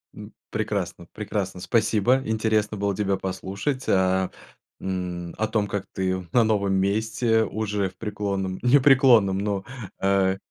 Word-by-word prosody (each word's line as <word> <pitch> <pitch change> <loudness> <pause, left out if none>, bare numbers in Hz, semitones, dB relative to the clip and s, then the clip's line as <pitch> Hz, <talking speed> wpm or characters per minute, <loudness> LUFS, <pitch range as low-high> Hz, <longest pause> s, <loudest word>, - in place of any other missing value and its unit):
М. - - -10 0.2
Прекрасно 85 - -3
прекрасно, 100 -3 -3
спасибо, 115 +4 +2
интересно 110 -1 0
было 100 0 -1
тебя 100 -1 0
послушать, 95 +8 -3
а, 95 0 +2 0.5
м, 90 -2 -4
о 110 - 0
том, 110 -2 0
как 100 -2 -3
ты 95 -1 -2
на 120 - +4
новом 100 -3 +1
месте 110 +3 +1
уже 105 -2 -2
в 90 - -23
преклонном 100 -3 -3
не 125 +4 +5
преклонном, 125 -8 +5
ну, 100 -1 -2 0.4
э 95 -1 +2
100 Hz, 135 wpm, -24 LUFS, 95-110 Hz, 0.5 s, не